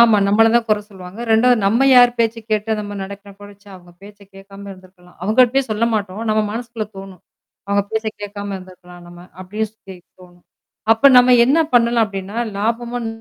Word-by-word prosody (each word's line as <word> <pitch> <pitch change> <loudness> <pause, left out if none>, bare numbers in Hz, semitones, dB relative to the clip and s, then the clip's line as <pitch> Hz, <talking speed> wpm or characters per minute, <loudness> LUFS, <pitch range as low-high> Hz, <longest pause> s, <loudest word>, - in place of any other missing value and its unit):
ஆமா. 230 -2 +6
நம்மள 225 +2 +4
தான் 235 - +1
குறை 215 -1 +1
சொல்லுவாங்க. 185 0 -12
2வது 245 +2 +4
நம்ம 235 +7 +2
யார் 245 0 +7
பேச்சை 230 0 0
கேட்டு 215 +1 -1
நம்ம 205 0 -7
நடக்கிற 200 +1 -10
கூட, 205 0 -12
ச்சே! 205 - -21
அவங்க 175 -1 -18
பேச்சை 205 0 -15
கேட்காம 195 +1 -13
இருந்திருக்கலாம் 185 -1 -20
அவங்க 215 +6 -2
கிட்டயும் 255 +1 0
சொல்ல 215 +2 0
மாட்டோம் 205 +1 -4
நம்ம 215 - +1
மனசுக்குள்ளே 230 -1 -6
தோணும். 195 -2 -12 0.5
அவங்க 200 0 +1
பேச்சை 220 0 -2
கேட்காம 205 0 -7
இருந்திருக்கலாம் 180 -1 -14
நம்ம 175 0 -14 0.2
அப்டியே 210 +4 -4
சொல்லி 195 -3 -14 0.3
தோணும். 175 -1 -19 0.5
அப்போ 225 +5 +3
நம்ம 250 0 +5
என்ன 280 +6 +2 0.2
பண்ணலாம் 235 -1 +3
அப்படின்னா 195 +2 -7 0.2
லாபமும் 235 +3 -3
210 Hz, 175 wpm, -18 LUFS, 195-230 Hz, 0.5 s, யார்